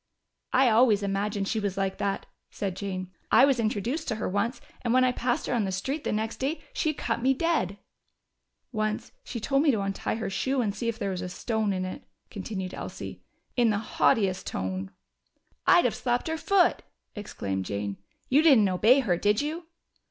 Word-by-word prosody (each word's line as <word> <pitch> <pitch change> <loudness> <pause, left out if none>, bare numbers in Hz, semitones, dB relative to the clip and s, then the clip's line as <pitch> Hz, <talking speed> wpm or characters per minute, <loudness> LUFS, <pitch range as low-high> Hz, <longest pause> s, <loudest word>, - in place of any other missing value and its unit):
"I 265 0 +5
always 220 -3 +4
imagined 200 0 -1
she 220 - 0
was 200 -2 -2
like 195 -1 -1
that," 200 -1 -1 0.2
said 195 -3 -3
Jane. 185 -2 -4 0.2
"I - - +8
was 270 -3 +2
introduced 230 +8 -1
to 220 - 0
her 215 - -3
once, 205 +7 -1 0.2
and 240 0 +1
when 255 - +5
I 255 - +4
passed 245 +3 -1
her - - -1
on 235 -3 +2
the 190 - -1
street 265 +11 -3
the - - 0
next 220 +1 -2
day 280 +5 -1
she 315 - +1
cut 255 -5 -2
me 265 +2 +3
dead." 300 - 0 0.9
"Once 215 -2 -2
she 240 - -5
told 275 +5 +2
me 305 - +3
to 220 -7 +2
untie 195 +1 -2
her 225 - -3
shoe 265 +7 0
and 215 -5 0
see 230 +3 -4
if 230 - -3
there 200 -4 -2
was 180 -1 -3
a 180 - -4
stone 220 +2 -1
in 185 -1 -1
it," 185 - -6 0.3
continued 190 -2 -5
Elsie. - - -7 0.3
"In 240 -2 +4
the 210 - +2
haughtiest 200 -2 +1
tone!" 95 +1 -3 0.8
"I'd - - +6
have - - +2
slapped 245 +3 -1
her 320 - 0
foot!" 370 +1 +3 0.3
exclaimed 100 - -4
Jane. 100 0 -3 0.3
"You 280 +4 +5
didn't 270 -11 +6
obey 220 +9 +5
her, 185 -9 +1
did 205 +3 +2
you?" 315 +3 -3
215 Hz, 195 wpm, -27 LUFS, 195-255 Hz, 0.9 s, I